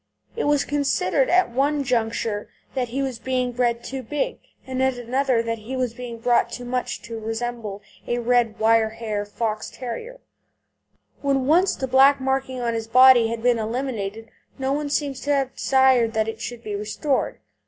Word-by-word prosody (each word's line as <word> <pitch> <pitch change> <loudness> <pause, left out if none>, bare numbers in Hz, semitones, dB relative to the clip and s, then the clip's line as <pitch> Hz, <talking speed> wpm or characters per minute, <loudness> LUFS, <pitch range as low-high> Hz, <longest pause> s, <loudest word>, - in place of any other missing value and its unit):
It 465 - -1
was 290 -1 +2
considered 275 -4 +1
at 360 -6 +3
one 280 +3 +1
juncture 225 -4 -1 0.2
that 255 -2 -1
he 265 +4 -2
was 260 -4 -3
being 255 0 -1
bred 240 -1 0
too 265 0 -5
big, 295 - -3 0.3
and 260 0 -3
at 265 -1 +1
another 245 0 +1
that 230 -1 -3
he 230 +5 -6
was 250 -3 -1
being 240 -1 -7
brought 240 +1 +2
too 245 - -6
much 245 0 -3
to 230 -1 -6
resemble 225 -2 -4 0.2
a 240 - 0
red 240 -2 +2
wire 225 0 +3
hair 215 -2 -4
Fox 215 0 -3
terrier. 455 - -7 1.0
When 275 -2 +1
once 350 +7 +4
the 265 - -3
black 270 +2 +6
marking 265 -1 -1
on 235 -1 -1
his 225 -1 -3
body 255 -1 +7
had 230 0 -4
been 245 -2 +3
eliminated 225 -2 -4 0.3
no 270 0 -1
one 295 0 -2
seems 285 -2 -1
to 290 - 0
have 270 -1 -1
desired 260 -4 +3
that 220 -1 +1
it 225 - -5
should 240 -1 -6
be 210 -1 -4
restored. 215 +7 -1
245 Hz, 180 wpm, -23 LUFS, 225-265 Hz, 1.0 s, body